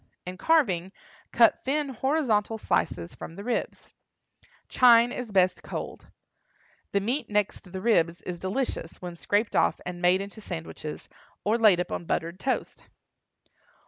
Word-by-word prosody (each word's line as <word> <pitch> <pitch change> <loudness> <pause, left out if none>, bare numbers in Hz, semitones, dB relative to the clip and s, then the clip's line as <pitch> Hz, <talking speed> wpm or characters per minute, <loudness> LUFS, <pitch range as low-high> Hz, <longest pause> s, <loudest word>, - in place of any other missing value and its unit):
In 180 +1 -6
carving, 190 - +2 0.4
cut 230 -2 +4
thin 285 +2 0
horizontal 245 -5 0
slices 85 - -1
from 165 - -9
the 200 - -8
ribs. 245 +2 -3 0.7
Chine 240 -1 +6
is 245 -4 -5
best 185 -2 +3
cold. - - -7 0.8
The 200 - +2
meat 235 +5 -2
next 205 -3 -1
the 190 0 -5
ribs 170 -6 +2
is 175 -1 -5
delicious 190 -3 -3
when 175 -1 -7
scraped 205 +5 0
off - - +2
and 175 -1 -6
made 180 +1 +4
into 200 +2 -8
sandwiches, 165 -4 -7 0.4
or 220 +3 +1
laid 210 -6 +6
upon 180 -1 -3
buttered 170 +2 -2
toast. 260 +4 -3
200 Hz, 140 wpm, -27 LUFS, 180-235 Hz, 0.8 s, Chine